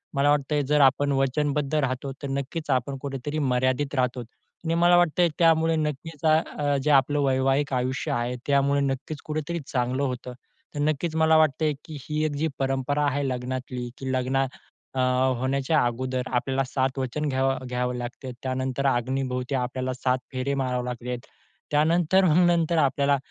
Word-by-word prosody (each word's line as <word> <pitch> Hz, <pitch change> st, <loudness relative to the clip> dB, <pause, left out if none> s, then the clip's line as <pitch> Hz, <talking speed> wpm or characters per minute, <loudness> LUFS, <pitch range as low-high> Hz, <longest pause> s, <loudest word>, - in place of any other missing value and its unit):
मला 140 Hz, +1 st, +3 dB
वाटतं 145 Hz, 0 st, +1 dB
आहे 145 Hz, -, +2 dB
जर 150 Hz, 0 st, +3 dB
आपण 140 Hz, +1 st, +4 dB
वचनबद्ध 140 Hz, +2 st, 0 dB
राहतो, 135 Hz, -1 st, -1 dB
तर -, -, -2 dB
नक्कीच 140 Hz, +3 st, -4 dB
आपण 130 Hz, +2 st, 0 dB
कुठे 140 Hz, -1 st, -4 dB
तरी 150 Hz, +1 st, -2 dB
मर्यादित 130 Hz, +1 st, 0 dB
राहतो 125 Hz, -1 st, 0 dB
आणि 160 Hz, +7 st, -7 dB
मला 175 Hz, +1 st, +5 dB
वाटतंय 175 Hz, 0 st, +3 dB
त्यामुळे 165 Hz, -1 st, +4 dB
नक्कीच 150 Hz, 0 st, -3 dB
अ, -, -, +5 dB, 0.3 s
अ, 145 Hz, -1 st, +1 dB
जे 150 Hz, -, +2 dB
आपलं 145 Hz, +1 st, +4 dB
वैवाहिक 135 Hz, +1 st, +1 dB
आयुष्य 130 Hz, +1 st, -1 dB
आहे, 120 Hz, +1 st, -1 dB
त्यामुळे 140 Hz, 0 st, +3 dB
नक्कीच 140 Hz, +2 st, -3 dB
कुठे 155 Hz, 0 st, -2 dB
तरी 170 Hz, 0 st, -1 dB
चांगलं 125 Hz, +2 st, -1 dB
होतं. 125 Hz, -1 st, -3 dB, 0.4 s
तर -, -, -3 dB
नक्कीच 155 Hz, +2 st, 0 dB
मला 160 Hz, 0 st, +4 dB
वाटतं 155 Hz, 0 st, +3 dB
आहे, 150 Hz, -, +2 dB
की 155 Hz, -2 st, -8 dB
ही 155 Hz, +1 st, 0 dB
एक 155 Hz, -, 0 dB
जी 160 Hz, +3 st, 0 dB
परंपरा 135 Hz, +2 st, 0 dB
आहे 140 Hz, 0 st, 0 dB
लग्नातली, 125 Hz, -1 st, -4 dB
की 130 Hz, -1 st, -4 dB
लग्ना 130 Hz, +1 st, +1 dB, 0.5 s
अ, -, -, -1 dB, 0.4 s
होण्याच्या 135 Hz, +4 st, +1 dB
अगोदर 130 Hz, +1 st, -2 dB
आपल्याला 135 Hz, +2 st, 0 dB
7 135 Hz, 0 st, -1 dB
वचन 140 Hz, +4 st, -2 dB
घ्यावं 135 Hz, 0 st, 0 dB
घ्यावं 125 Hz, 0 st, -1 dB
लागते. 125 Hz, +1 st, -6 dB
त्यानंतर 130 Hz, +1 st, -2 dB
अग्नीभोवती 125 Hz, +1 st, -1 dB
आपल्याला 130 Hz, 0 st, -2 dB
7 130 Hz, 0 st, 0 dB
फेरे 130 Hz, +2 st, -2 dB
मारावे 125 Hz, -2 st, -1 dB
लागले 125 Hz, 0 st, -5 dB
आहेत, 125 Hz, -1 st, -3 dB, 0.5 s
त्यानंतर 170 Hz, +5 st, +3 dB
मग 175 Hz, +2 st, +4 dB
नंतर 170 Hz, -1 st, +2 dB
आपल्याला 140 Hz, -1 st, +3 dB
135 Hz, 170 wpm, -25 LUFS, 130-150 Hz, 0.5 s, मला